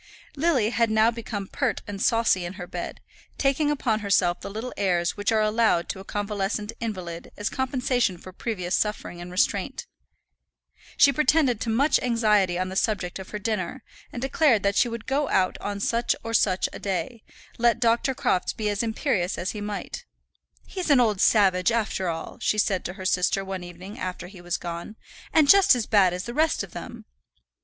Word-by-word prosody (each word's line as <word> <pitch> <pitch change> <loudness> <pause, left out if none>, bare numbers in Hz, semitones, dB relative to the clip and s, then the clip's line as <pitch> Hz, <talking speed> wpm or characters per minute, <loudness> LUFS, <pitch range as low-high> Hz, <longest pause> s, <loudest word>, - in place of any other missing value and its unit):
Lily 275 -8 +2
had 230 -2 +2
now 220 +1 +4
become 225 -3 -5
pert 255 +4 -2
and 200 -1 -6
saucy 225 -5 +2
in 175 +1 -5
her 180 - -7
bed, - - -6 0.4
taking 280 +2 +1
upon 250 -7 0
herself 185 -4 +1
the - - -6
little 220 +5 -5
airs 175 -3 0
which 205 +1 -1
are 220 -1 +3
allowed 215 -5 +2
to 195 - -4
a - - -8
convalescent 205 +1 -3
invalid 185 -7 -5
as 210 - -2
compensation 250 -6 0
for 185 +2 -12
previous 185 -4 -3
suffering 210 -5 -2
and 175 - -8
restraint. 185 +1 -1 1.1
She 280 - +6
pretended 275 -4 +2
to 230 - -2
much 270 +6 +3
anxiety 210 -7 +2
on 185 0 -2
the 190 - -6
subject 195 -3 -1
of 190 - -9
her 210 - -4
dinner, 215 +3 -3 0.3
and - - -6
declared 270 - +3
that 200 0 +1
she 245 - +4
would 230 -1 -6
go 280 +2 0
out 185 -1 +2
on 205 0 -4
such 235 +3 +1
or 230 - -5
such 190 -4 +2
a - - -7
day, 195 +3 -3 0.4
let 235 -1 +3
Dr. 235 +3 +2
Crofts 185 -6 0
be 215 -1 -2
as 205 0 -1
imperious 220 -5 -1
as 185 - -2
he 210 - -6
might. 205 0 -5 0.6
"He's 370 -4 -4
an 280 -3 +6
old 215 -5 +2
savage, 190 -2 +4
after 215 -5 -1
all," 165 -1 -6
she 215 - +1
said 195 -3 +1
to 175 - -4
her 190 -1 -9
sister, 185 +2 +1
one 190 -1 -5
evening, 175 +3 -10
after 180 -1 -4
he 185 -2 -13
was 175 0 -2
gone, 170 +4 -6 0.4
"and 310 -3 +4
just 395 -4 +7
as 235 -3 -1
bad 195 -4 +4
as 180 +1 -4
the 235 - -6
rest 315 -4 +1
of 195 - -10
them." - - -9
210 Hz, 195 wpm, -25 LUFS, 185-235 Hz, 1.1 s, just